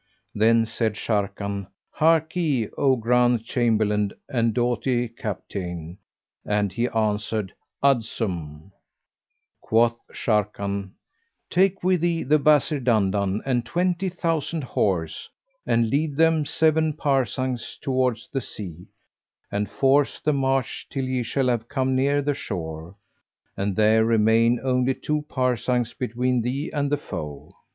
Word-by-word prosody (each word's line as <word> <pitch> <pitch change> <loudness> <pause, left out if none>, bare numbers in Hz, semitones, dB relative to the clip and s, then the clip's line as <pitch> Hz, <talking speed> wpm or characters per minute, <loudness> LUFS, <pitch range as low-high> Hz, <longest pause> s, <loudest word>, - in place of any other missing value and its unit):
Then 115 +2 +4
said 110 -1 -1
Sharrkan, 100 -2 -2 0.3
"Harkye, 160 -5 +2
O 135 -2 +3
grand 120 0 +2
Chamberlain 105 -4 +1 0.2
and 115 -4 +1
doughty 120 +1 0
Capitayne!" 90 -6 -6 0.4
and 105 -2 0
he 120 0 0
answered, 110 -2 -1 0.3
"Adsum!"[FN#397] 95 - -1 0.9
Quoth 115 +1 +2
Sharrkan, 100 -2 -1 0.6
"Take 190 +1 +2
with 185 -2 +2
thee 170 -1 +1
the 150 +3 +3
Wazir 150 0 +3
Dandan 105 -4 +1
and 125 -3 +1
twenty 180 +6 0
thousand 165 -3 -2
horse, 90 -9 -1 0.4
and 115 -1 +2
lead 145 +1 0
them 160 -1 +3
seven 160 +1 +2
parasangs 130 -4 -1
towards 130 -4 0
the 135 - 0
sea, 90 -7 -8 0.6
and 105 0 -1
force 135 +1 +2
the 150 - +1
march 135 -2 -1
till 135 -2 -2
ye 130 -1 -1
shall 130 +3 0
have 120 -2 -1
come 130 -2 0
near 140 +2 +2
the 145 +1 +1
shore, 85 - -6 0.6
and 100 0 -2
there 110 +1 +4
remain 115 +1 +3
only 130 0 +1
two 150 0 -2
parasangs 125 -1 0
between 125 +1 -1
thee 130 +6 -3
and 145 -1 -1
the 145 - +2
foe. 75 - -7
120 Hz, 125 wpm, -24 LUFS, 105-140 Hz, 0.9 s, Then